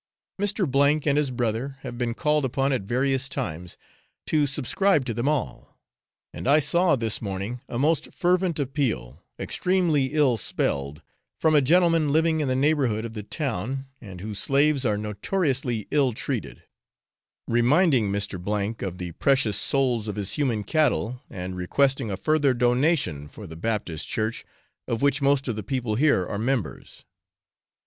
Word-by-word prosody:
Mr. 150 -7 +2
and 140 -2 +2
his 145 -3 0
brother 125 +2 -2
have - - -7
been 120 -1 -2
called 150 0 +1
upon 135 +2 0
at 125 - 0
various 130 +5 0
times 90 - -5 0.5
to 150 -2 +2
subscribe 145 +4 +1
to 120 - -2
them 120 +6 0
all; 150 -7 -3 0.5
and - - -6
I 145 +2 +6
saw 155 +3 +3
this 115 -4 -1
morning 100 +4 -4
a 120 - -4
most 150 +4 +1
fervent 180 -1 +1
appeal, 130 - -2 0.2
extremely 175 -7 +1
ill 140 -6 +3
spelled, 70 -7 -2 0.4
from 160 - +3
a 150 - +6
gentleman 165 0 +3
living 160 +1 +2
in 150 - 0
the 130 - +1
neighbourhood 130 -6 +1
of 115 - -7
the 105 - -5
town, 135 - -3 0.2
and 95 -6 -10
whose 105 0 -4
slaves 140 -1 +2
are 105 -1 +1
notoriously 120 - -1
ill 140 -4 +2
treated; - - -4 0.8
reminding 125 - +3
Mr. 100 +2 -2
of 90 -1 -6
the 90 -1 -5
precious 115 - +1
souls 125 -5 +1
of 105 - -3
his 100 -2 -1
human 125 -8 0
cattle, 125 -4 0
and 90 -3 -6
requesting 135 +7 +1
a 95 - -3
further 145 +4 +2
donation 120 - +1
for 105 +7 -11
the 80 -3 -9
Baptist 90 -4 -3
Church, 110 +1 -2 0.4
of 115 +3 -2
which 140 0 +2
most 140 0 +2
of 120 - -1
the 110 - -4
people 120 +1 -2
here 130 -6 +3
are 100 - -4
members. 120 -1 -3
130 Hz, 155 wpm, -25 LUFS, 105-145 Hz, 0.8 s, I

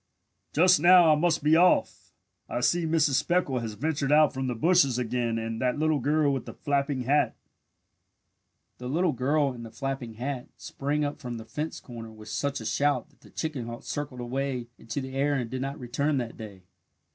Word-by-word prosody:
"Just 180 +3 +5
now 175 0 +7
I - - +5
must 160 -1 +1
be 155 +2 +5
off. 180 +2 +2 0.4
I 120 - -2
see 170 +5 +2
Mrs. 155 -4 +3
Speckle 145 -5 0
has 115 -2 -5
ventured 145 0 -1
out 150 0 +5
from 130 0 -3
the 125 - -2
bushes 155 -2 +3
again 120 -1 -1
and 115 0 -4
that 125 +1 +1
little 155 -1 +1
girl 145 +1 +2
with 135 - -4
the - - -8
flapping 140 -2 -1
hat 145 +4 +2 0.7
" - - -50
The 125 - -6
little 165 +6 +1
girl 140 +2 +1
and 120 -2 -9
the 115 - -8
"flapping 125 -1 -5
hat" 125 +2 -4
sprang 145 +2 -2
up 145 - -4
from 120 -2 -5
the 110 - -9
fence 150 +6 -4
corner 115 -3 -9
with 110 -1 -12
such 140 +4 -2
a 110 - -8
shout 145 +6 0
that - - -31
the - - -17
chicken 145 -7 -4
hawk 120 0 -7
circled 135 -4 -5
away 125 -1 -3
into 115 +5 -4
the 130 0 -7
air 140 +2 +1
and 125 -4 -3
did 130 0 -3
not 135 +2 -3
return 140 +3 -1
that 120 -3 -3
day. 100 -4 -10
135 Hz, 205 wpm, -27 LUFS, 120-150 Hz, 0.7 s, now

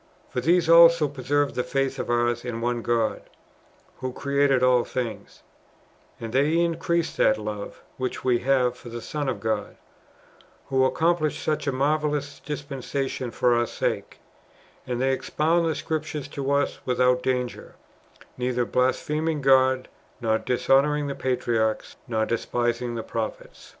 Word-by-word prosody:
For 125 - -2
these 170 +5 +3
also 165 -1 +7
preserve 145 +1 0
this 125 - -3
faith 135 0 0
of - - -4
ours 120 0 +1
in 120 -2 -4
one 120 0 -1
God 115 -1 0 0.8
who 130 0 -4
created 140 -1 +1
all 125 -1 +4
things; 115 -5 -5 0.8
and 115 0 -6
they 145 +5 +3
increase 170 0 0
that 110 - +4
love 105 -1 -6
[which 130 0 -3
we 125 -2 +2
have] 125 -1 +2
for 120 - -11
the 120 0 -6
Son 145 +3 -3
of 130 - -3
God, 110 -1 -2 0.9
who 130 -1 +3
accomplished 160 +2 +1
such 150 -1 -1
marvellous 145 +1 -1
dispensa 140 -2 -4
tions 125 -2 -5
for 125 - +3
our 120 0 +2
sake: - - -3 0.7
and 125 -1 -2
they 135 +1 +2
expound 165 +5 +1
the 160 - 0
Scriptures 150 -1 -3
to 140 -1 -4
us 140 0 +1
without 125 0 +2
danger, 125 -1 -3 0.6
neither 125 -1 0
blaspheming 150 +6 0
God, 130 -1 +3 0.3
nor 110 -2 +1
dishonouring 140 +4 +2
the - - -2
patriarchs, 115 -4 -1
nor 110 -2 0
despising 120 +1 -1
the 115 - -4
propliets. 110 -1 -6
130 Hz, 145 wpm, -25 LUFS, 120-145 Hz, 0.9 s, also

